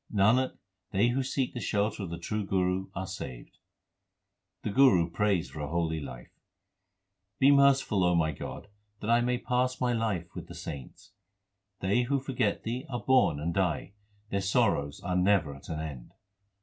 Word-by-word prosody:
Nanak, 110 +6 +3 0.3
they 105 +5 +2
who 130 +3 +1
seek 130 0 -1
the 120 - -4
shelter 105 0 -1
of 95 - -4
the 85 - -5
true 105 +5 -3
Guru 95 -1 0
are 95 - -3
saved. 65 -10 -8 1.0
The 105 - -2
Guru 100 -10 +5
prays 100 -2 +1
for 75 - -8
a 75 - -3
holy 80 0 -1
life: 65 -4 -9 1.1
Be 135 +5 +6
merciful, 140 -8 +4
O 90 0 +3
my 80 -2 +2
God, 75 - -7 0.3
that 110 - -1
I 120 0 +5
may 125 +1 +1
pass 125 +1 0
my 125 -1 +1
life 105 -7 -2
with - - -7
the - - -10
saints! 70 -6 -8 0.7
They 100 +6 +2
who 135 +3 0
forget 125 -6 -1
Thee 120 +3 -3
are 120 -2 -2
born 130 - +4
and 85 +3 -2
die; 95 +1 -1 0.4
their 100 - 0
sorrows 95 - +1
are 90 -2 -2
never 90 -5 +3
at 70 - -13
an 80 -1 -3
end. 70 -6 -7
100 Hz, 175 wpm, -29 LUFS, 85-120 Hz, 1.1 s, Be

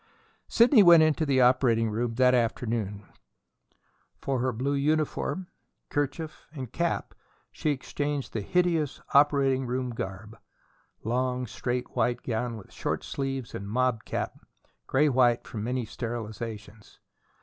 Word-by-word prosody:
Sidney 235 0 +6
went 170 -4 +8
into 155 0 +2
the 135 -2 +3
operating 120 -3 +3
room 115 +1 -2
that 125 +1 +4
afternoon. 115 -4 -1 1.1
For 135 -2 -1
her 130 +1 +1
blue 130 +5 -1
uniform, 155 +5 0 0.5
kerchief, 145 +2 -3
and 130 -5 -7
cap 170 0 -1 0.4
she 155 - -2
exchanged 145 0 -3
the 110 - -2
hideous 165 - +1
operating 140 -2 +4
room 125 0 -2
garb: 105 +1 -7 0.6
long, 125 +2 -1
straight 125 +2 -4
white 120 0 0
gown 115 0 -2
with 100 - -13
short - - -3
sleeves 135 -3 -4
and 100 +1 -6
mob 125 0 +1
cap, - - -3 0.5
gray 145 +3 +3
white 125 -3 +3
from 105 -3 -6
many 125 +1 -1
sterilizations. 110 -2 -7
125 Hz, 125 wpm, -27 LUFS, 115-140 Hz, 1.1 s, went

